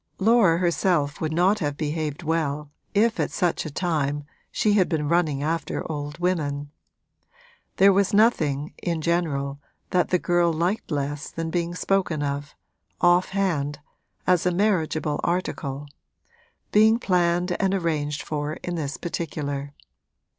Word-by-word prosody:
Laura 205 -5 +4
herself 170 -4 +1
would 155 -1 -1
not 185 +6 +3
have 145 -3 -2
behaved 155 +1 -3
well 150 -2 -1 0.2
if 225 +2 +3
at - - +1
such 175 -3 -1
a - - -4
time 145 -3 -1 0.3
she 210 - +2
had 195 -3 +3
been 155 -3 -1
running 155 -4 +1
after 165 +2 -2
old 145 0 -5
women. 145 -5 -1 1.1
There 195 0 +6
was 200 +1 +2
nothing, 155 - +2
in 170 -3 -1
general, 145 -5 -1 0.3
that 180 -2 +2
the 180 - +3
girl 175 -1 +2
liked 175 +6 -1
less 145 -1 -3
than 165 0 -4
being 175 0 -1
spoken 180 -5 0
of, 145 +1 -4 0.4
off 175 +1 +4
hand, 160 -8 -1 0.5
as 180 -2 +3
a - - +3
marriageable 160 -6 0
article 145 -5 -2 0.8
being 220 +2 +5
planned 180 -4 +1
and 195 -2 +2
arranged 150 -5 -1
for 150 0 -3
in 175 - -5
this 150 -4 -3
particular. 145 -4 -4
165 Hz, 140 wpm, -24 LUFS, 145-180 Hz, 1.1 s, There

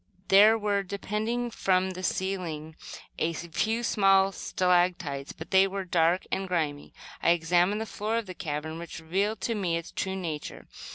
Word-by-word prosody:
There 210 +3 +7
were, 205 -2 0
depending 215 +5 -3
from 190 -2 +1
the 185 0 -7
ceiling, 175 -5 -3 0.4
a 165 +1 0
few 215 +8 -2
small 195 -3 +4
stalactites, 175 -7 0
but 160 - -10
they 190 0 +6
were 195 0 -4
dark 170 0 +2
and 195 0 -1
grimy. 155 -5 -2 0.3
I - - +3
examined 175 +5 +2
the - - -2
floor 220 +1 -2
of 230 - -2
the 185 - -7
cavern, 160 0 -4
which 170 -1 -8
revealed 195 +6 -1
to 230 - -1
me 180 -6 0
its 170 - -7
true 190 0 -3
nature. 165 -6 -5
185 Hz, 165 wpm, -28 LUFS, 165-200 Hz, 0.4 s, There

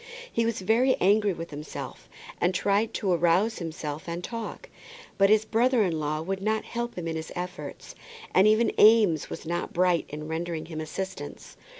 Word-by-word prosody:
He 230 0 +1
was 230 -4 -2
very 235 +7 +3
angry 205 +2 +4
with 165 -2 -6
himself, 150 +1 -8 0.3
and 180 +1 +2
tried 205 +4 +1
to 195 -3 0
arouse 175 +6 +2
himself 155 -2 -5
and 170 +1 -4
talk. 230 0 -6 0.5
But 195 0 +6
his 215 0 +4
brother 235 +1 +3
in 170 -5 -1
law 155 +1 -2
would 190 +2 -3
not 220 +2 0
help 240 0 -4
him 170 -2 -4
in 165 - -2
his 160 0 -5
efforts; 180 +1 -6 0.4
and 190 +3 +6
even 220 +2 +4
Eames 210 -8 +5
was - - -7
not 175 +2 -3
bright 180 -1 +2
in 150 +1 -6
rendering 160 0 -3
him 160 -1 -6
assistance. 155 - -6
185 Hz, 180 wpm, -27 LUFS, 165-215 Hz, 0.5 s, But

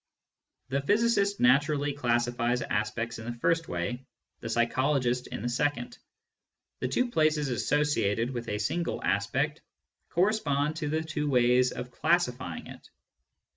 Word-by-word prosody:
The 140 +2 0
physicist 205 +3 +2
naturally 145 +3 +3
classifies 120 -2 0
aspects 115 +2 -2
in 110 - -8
the 120 - -3
first 165 +6 +1
way, 105 +9 -3 0.4
the 115 - -6
psychologist 125 +2 +1
in - - -6
the - - -1
second. 145 - -1 0.8
The - - -1
two 250 -1 0
places 155 - +2
associated 125 -4 +1
with 120 -2 -5
a 105 - -1
single 170 +12 -2
aspect 130 +11 0 0.5
correspond 160 -6 +1
to 155 -3 -2
the 160 +1 0
two 150 -2 -2
ways 125 -1 +4
of 125 0 -6
classifying 130 - 0
it. - - -12
135 Hz, 135 wpm, -28 LUFS, 120-155 Hz, 0.8 s, ways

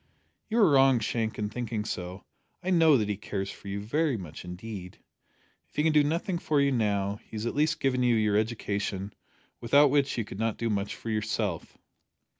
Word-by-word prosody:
"You 225 - 0
are 215 -5 +6
wrong, 135 -2 +6
Shank, 110 0 -2
in 105 -1 -2
thinking 115 -2 -3
so. 90 -2 -5 0.4
I 185 - -1
know 160 -5 +6
that 105 -3 0
he 105 -2 -2
cares 95 -1 -4
for - - -12
you 100 +1 -3
very 140 +6 0
much 90 -7 -8
indeed. 90 +1 -8 0.7
If - - -32
he 150 - +1
can 160 0 +3
do 150 -1 +5
nothing 170 +4 -1
for 150 -3 +1
you 140 0 +3
now, 100 -4 0
he - - -11
has 110 +1 -3
at 120 - -1
least 155 +2 +1
given 130 -2 +1
you 120 -1 +3
your 105 -2 +2
education, 105 -3 -2 0.5
without 140 +4 +5
which 140 -2 +2
you 115 - -1
could 100 - -9
not 115 -1 0
do 115 -1 -1
much 100 -1 -2
for 115 - -6
yourself." 105 -4 -2
115 Hz, 205 wpm, -28 LUFS, 100-140 Hz, 0.7 s, are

